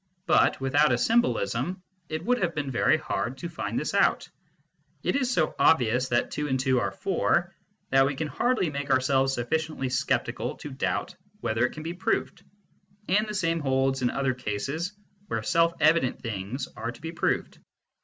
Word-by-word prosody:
But 170 - +3
without 140 +2 +3
a 120 - +3
symbolism 180 - +1 0.3
it 155 +1 -4
would 245 +1 +2
have 170 -2 0
been 145 -3 -2
very 120 - +3
hard 130 +3 -3
to 155 - -5
find - - -4
this - - -2
out. - - +2 0.8
It - - 0
is 255 -3 +1
so 165 -10 +1
obvious 130 -4 +4
that 120 - +1
two 150 0 -2
and 130 -2 0
two 130 -1 +2
are - - 0
four, 175 -1 0 0.4
that 135 0 +5
we 140 - -2
can 155 +3 -2
hardly 230 -2 0
make 140 -1 -4
ourselves 135 0 +3
sufficiently 135 +2 -2
sceptical 125 - -1
to - - -8
doubt - - -2 0.3
whether 120 +1 +1
it - - -11
can 155 - -8
be 165 +2 -4
proved. 185 +2 -1 0.7
And 210 +4 +3
the 210 - -4
same 165 -3 +1
holds 135 -2 +1
in 125 - +2
other 135 0 0
cases 140 - -3 0.3
where - - -2
self 170 -1 +3
evident 155 -4 +3
things 115 +4 -4
are 115 +2 -4
to - - -14
be 165 +1 -6
proved. 170 - -1
140 Hz, 180 wpm, -27 LUFS, 130-170 Hz, 0.8 s, that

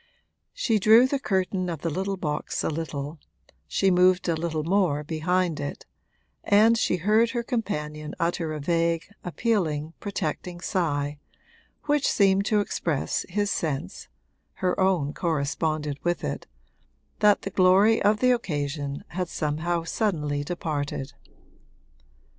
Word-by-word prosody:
She 230 - +1
drew 220 +5 +7
the 275 +1 0
curtain 190 -5 -1
of 165 -4 -5
the 190 +4 -2
box 150 -3 -2
a - - 0
little, 150 -1 -5 0.5
she 195 - +2
moved 180 +1 +4
a 170 - +2
little 160 -1 -2
more 170 -4 +1
behind 165 +2 0
it, 145 - -5 0.6
and 220 +3 +5
she 220 - +1
heard 215 +6 +3
her 240 0 -2
companion 150 - -3
utter 170 -1 -1
a 155 - -4
vague 165 +2 +1 0.2
appealing, 165 -6 -1
protecting 180 -3 -4
sigh, 145 -6 -1 0.6
which 295 -1 +1
seemed 195 -1 +3
to 210 -1 +3
express 165 -7 -2
his 205 +2 0
sense 140 - -3 0.5
(her 180 - -1
own 180 -7 +2
corresponded 150 -2 -1
with 175 0 -1
it) - - -4 0.7
that 210 -1 +4
the 195 - -4
glory 190 +5 +5
of 210 +1 +3
the 255 0 +5
occasion 145 - -2
had 180 -1 -3
somehow 165 +3 -1
suddenly 150 -7 -1
departed. 145 -4 -3
175 Hz, 130 wpm, -26 LUFS, 150-200 Hz, 0.7 s, drew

